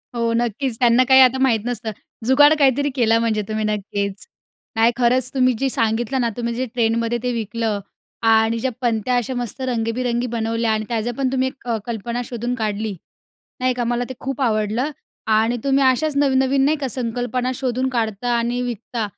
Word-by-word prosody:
हो 230 -1 0
नक्कीच 235 +1 -1
त्यांना 240 0 +5
काही 265 0 +8
आता 260 0 +5
माहीत 245 -4 +3
नसतं. 235 -2 -3 0.3
जुगाड 290 +4 +6
काहीतरी 285 +1 +3
केलं 230 -3 +3
म्हणजे 225 -2 0
तुम्ही, 215 0 -2
नक्कीच. 200 -1 -3 0.5
नाही 225 +1 +4
खरंच 250 +1 +2
तुम्ही 255 -2 +3
जे 270 - +1
सांगितलं 235 +3 0
ना, 235 - +1
तुम्ही 235 -1 -2
जे 255 +2 -1
ट्रेनमध्ये 230 0 +1
ते 250 - 0
विकलं 225 -1 -2 0.5
आणि 225 +1 +4
ज्या 260 +3 -1
पणत्या 235 0 0
अशा 245 +2 -2
मस्त 245 +1 -5
रंगबिरंगी 240 0 -1
बनवल्या 230 -1 -1
आणि 215 0 -1
त्याझं 230 0 -1
पण 265 -2 0
तुम्ही 260 0 +1
एक 260 -2 -9 0.2
कल्पना 235 +1 -3
शोधून 240 +1 -3
काढली. 215 -2 -2 0.6
नाही 255 0 +1
का? 245 0 -2
मला 240 +1 0
ते - - -4
खूप 270 +1 -4
आवडलं 220 +2 0 0.5
आणि 225 +3 +2
तुम्ही 275 0 +2
अशाच 275 +3 +2
नवनवीन 270 -1 +3
नाही 305 +2 +2
का 270 - 0
संकल्पना 245 +1 -2
शोधून 255 0 -1
काढता 230 -2 -2
आणि 240 +1 -1
विकता. 235 -1 -4
240 Hz, 175 wpm, -21 LUFS, 225-255 Hz, 0.6 s, काही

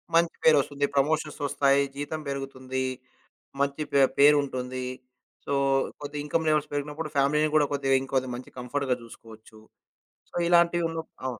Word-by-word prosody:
మంచి 170 0 +3
పేరొస్తుంది. 145 -2 +4
ప్రమోషన్సొస్తాయి, 140 -1 +2
జీతం 145 +2 -4
పెరుగుతుంది, 130 -1 -4 0.8
మంచి 140 +2 0
పే 140 - +5 0.2
పేరు 145 +1 +7
ఉంటుంది. 130 -1 -4 0.6
సో, - - -2 0.5
కొద్దిగా 145 0 -5
ఇన్‌కమ్ 160 +2 -1
లెవెల్స్ 155 -1 +2
పెరిగినప్పుడు 150 +2 -3
ఫ్యామిలీని 150 +3 +3
కూడా 150 - +4
కొద్దిగా, 135 -1 +1
ఇంకొద్ది 130 -1 -1
మంచి 125 +1 -9
కంఫర్ట్‌గా 125 +1 -1
చూసుకోవచ్చు. 110 -1 -14 0.7
సో, - - -17
ఇలాంటివి 170 0 +4
ఉన్న 165 0 -4 0.3
అవును. 125 -3 -3
140 Hz, 130 wpm, -27 LUFS, 130-150 Hz, 0.8 s, పేరు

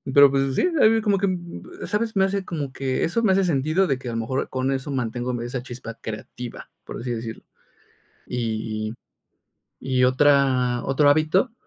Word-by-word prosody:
pero, 140 -1 +8
pues 135 -1 0
sí, - - +3
ahí 220 - +8
vi 225 0 +2
como 205 -2 +2
que, 200 +1 +1
mm, 185 - -6
¿sabes?, 220 +1 -1
me 190 -1 +4
hace, 195 0 -2
como 145 -6 -4
que 135 -1 -1
eso 230 +8 0
me 195 - +4
hace 195 - +3
sentido 160 +3 +2
de 135 -2 +1
que 130 - -8
a - - -3
lo - - -2
mejor, 115 +4 -2
con 130 +1 -1
eso 135 +1 -3
mantengo, 125 -1 -2
mm, 120 - -3
esa 120 +1 -4
chispa 120 -2 -8
creativa, 115 +2 -7 0.2
por - - -7
así 120 0 -4
decirlo. 115 -1 -5 0.8
Y 110 -2 -3 0.9
y 130 -1 -1
y - - +6
otra 130 -2 +3
otro 145 +2 +3
hábito, 155 - +3
135 Hz, 195 wpm, -23 LUFS, 125-175 Hz, 0.9 s, pero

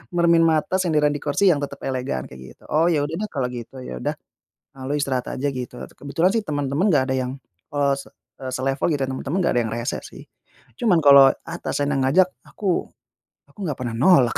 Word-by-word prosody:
Meremin 170 -1 +4
mata, 160 +4 +1
senderan 150 -5 +2
di 145 - -3
kursi 180 +8 +3
yang 145 - +1
tetap 140 -1 -6
elegan, 125 - -2
kayak 65 -1 -12
gitu. - - -26
"Oh, 160 +3 +3
ya 155 -4 +2
udah 150 +3 -3
deh 215 - -2
kalo 135 -4 -1
gitu, 125 +2 -8
ya, 65 - -6
udah. - - -2 0.6
Eee, 130 - -8
lo 145 - -1
istirahat 135 -3 -1
aja." 140 +2 -1
Gitu. 125 -2 -6
Et - - -9
kebetulan 165 +6 +1
sih 225 - +1
temen-temen 145 +5 0
enggak 130 -2 +2
ada 130 - +1
yang 130 0 -2 0.4
eee, 140 -1 +2
se - - -10 0.3
eee, 130 -1 -5
selevel, 135 +1 0
gitu, 140 - -2
ya. - - -4
Temen-temen 135 +6 -3
enggak 170 - +2
ada - - +4
yang 110 - -5
rese 120 +1 -2
sih. - - -12 0.6
Cuman, 215 -9 +3
kalo 140 -2 +8
atasan 145 0 -2
yang 135 - +1
ngajak, 185 +7 +4 0.2
aku 190 -4 -1 0.6
aku - - -22
nggak 150 -5 -2
pernah 120 -2 -3
nolak. 130 -3 +4
140 Hz, 215 wpm, -22 LUFS, 130-160 Hz, 0.6 s, kalo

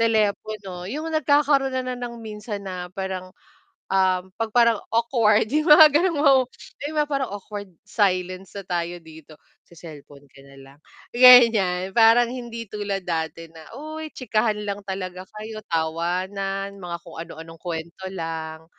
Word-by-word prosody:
telepono. 210 -4 -1
Yung 305 +8 -4
nagkakaroon 285 -2 +2
na 255 -1 -2
ng 240 -1 -6
minsan 210 -1 -6
na 180 -1 -6
parang, 190 -1 -5 0.6
ah, 185 -1 +2 0.2
'pag 225 -1 -1
parang 235 -3 +4 0.2
awkward 230 -2 +3
yung 305 +1 +1
mga 300 0 +9
gano'ng 290 -6 +3 0.3
'di 290 - -3
ba, 300 - +2
parang 275 -3 -1
awkward 205 0 -7 0.2
silence 185 -2 -1
na 200 - -6
tayo 175 -1 -3
dito, 160 -1 -14 0.3
sa 170 - -19
cellphone 145 -3 -13
ka 135 +1 -17
na 140 - -16
lang? 135 +1 -16 0.3
Gan'yan, 225 -7 +6
parang 230 +2 +5
hindi 235 -2 -6
tulad 205 -2 -3
dati 165 -1 -4
na, 160 -1 -14
uy 310 +2 -7
chikahan 220 -3 0
lang 205 0 -4
talaga 185 -1 -5
kayo, 215 0 -7
tawanan 185 +5 -2
mga 175 -2 -5
kung 170 - -12
anu-anong 165 0 -10
kuwento 170 +1 -6
lang, 160 -3 -6
200 Hz, 145 wpm, -23 LUFS, 175-235 Hz, 0.6 s, mga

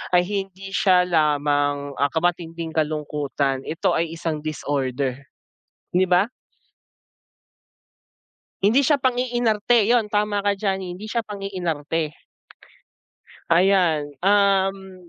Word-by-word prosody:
ay 175 - +5
hindi 195 -1 -5
siya 180 -2 +4
lamang, 145 -3 +1
ah, 140 0 +2
ka 160 - 0
matinding 165 -2 -2
kalungkutan, 150 -3 -1
ito 160 - 0
ay 165 0 -1
isang 160 -2 -4
disorder, 135 -4 -2 0.8
di 185 +1 +4
ba? 180 +3 +3 2.4
Hindi 230 +8 +4
siya 290 +1 +3
pang-iinarte 240 -3 +1
'yun, 230 -2 +2
tama 205 -1 0
ka 205 - +2
diyan, 195 -1 0
hindi 180 +4 -7
siya 235 +2 -1
pang-iinarte. 170 -7 -3 1.3
Ayan, 170 -5 +3
um. 195 -2 +1
180 Hz, 105 wpm, -22 LUFS, 150-200 Hz, 2.4 s, ay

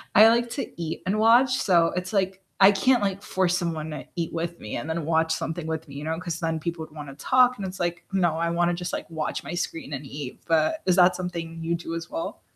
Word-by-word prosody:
I 215 +2 +9
like 235 +1 +2
to 275 - -3
eat 165 -1 -4
and 195 +3 0
watch, 240 +4 +5
so 170 -6 +3
it's 180 0 -3
like 190 -1 0 0.2
I 195 +1 +9
can't, 240 +5 +3
like, 195 -1 -1
force 185 -2 +1
someone 160 -3 -3
to 150 - -6
eat 170 -2 -2
with 170 +1 -3
me 105 - -5
and 145 +7 -5
then 160 0 -2
watch 160 0 +2
something 160 +1 -3
with 160 0 -3
me, 140 - -11
you 145 - -6
know, 160 +1 -1
'cause 170 -2 -4
then 165 -1 -1
people 165 0 -4
would 155 - -19
wanna 145 -3 -8
talk, 250 - +4
and 200 - -4
it's 190 0 -6
like, 175 0 -2
"No, 175 -4 +2
I 170 0 0
wanna 175 +1 +2
just, 175 0 -4
like, - - -4
watch 160 -2 -3
my - - -6
screen 170 -4 -4
and 140 0 -5
eat." 140 -1 -7
But 165 - +2
is 185 - +3
that 180 0 +6
something 170 -2 -5
you 165 +1 0
do 165 -1 -6
as 165 0 -6
well? 330 +1 -5
170 Hz, 255 wpm, -25 LUFS, 160-190 Hz, 0.2 s, I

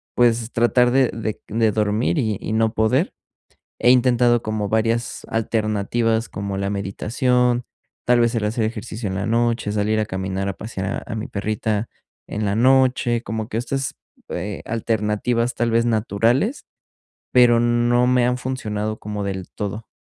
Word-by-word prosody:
pues, 120 -1 +2
tratar 120 +1 +3
de 130 -1 +3
de 110 -1 -4
de 110 0 +2
dormir 110 +8 +1
y 110 -7 0
y 110 - -4
no 110 0 +2
poder. 125 - +1 0.7
He 120 - +4
intentado 120 -1 +4
como 110 -2 -2
varias 115 +1 0
alternativas 110 +1 0
como 100 0 -4
la 100 0 -2
meditación, 120 +5 0 0.4
tal 120 0 +4
vez 120 0 +2
el 110 - 0
hacer 110 +1 -1
ejercicio 110 0 -4
en - - -3
la 100 - -2
noche, 115 -2 +1
salir 105 +1 +1
a 105 - -1
caminar, 95 +1 -3
a 100 - -2
pasear 95 0 -5 0.2
a 120 - -7
a - - -1
mi 110 - -4
perrita 110 +1 -2 0.4
en 105 0 -3
la 100 - 0
noche, 130 -1 +3
como 110 +1 -4
que 110 - -1
estas, 135 +2 -2 0.4
eh, 95 +4 -4
alternativas, 115 +2 0
tal 120 0 0
vez, 115 +1 +3
naturales, 120 - +1 0.7
pero 120 -2 +6
no 120 +1 +3
me 125 -1 +3
han 125 0 +1
funcionado 110 -4 -3
como 105 -1 -4
del 95 -2 -4
todo. 105 +2 -5
115 Hz, 160 wpm, -21 LUFS, 105-120 Hz, 0.7 s, pero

